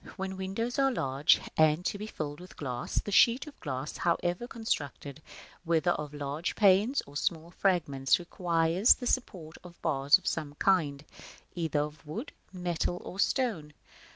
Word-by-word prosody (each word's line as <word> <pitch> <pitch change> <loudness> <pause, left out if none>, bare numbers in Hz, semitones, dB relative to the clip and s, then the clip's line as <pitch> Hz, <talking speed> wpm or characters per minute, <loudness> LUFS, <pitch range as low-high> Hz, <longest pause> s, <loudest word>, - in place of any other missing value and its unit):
When 190 0 -4
windows 195 +7 -3
are 270 0 +4
large, 135 - +3 0.2
and 155 +2 +3
to 200 - -2
be 210 - -5
filled 150 -7 -5
with 180 +1 -13
glass, 125 -4 -3
the 205 - -5
sheet 240 +7 +5
of 300 -2 -13
glass, 135 -1 -5
however 175 +5 0
constructed, 155 - -4 0.4
whether 170 +1 +2
of 150 -3 -3
large 145 +3 -4
panes 210 +6 +4
or 140 - -15
small 165 +2 -2
fragments, 150 -9 +2
requires 170 +2 +2
the 250 - -7
support 180 -11 -2
of 175 -1 -13
bars 145 -1 +4
of 190 - -21
some 145 -1 -2
kind, 150 -6 +1 0.5
either 160 -4 0
of 150 +1 -6
wood, 220 - -5 0.2
metal, 175 -1 -2
or 190 - -8
stone. 205 - 0
170 Hz, 155 wpm, -30 LUFS, 150-195 Hz, 0.5 s, sheet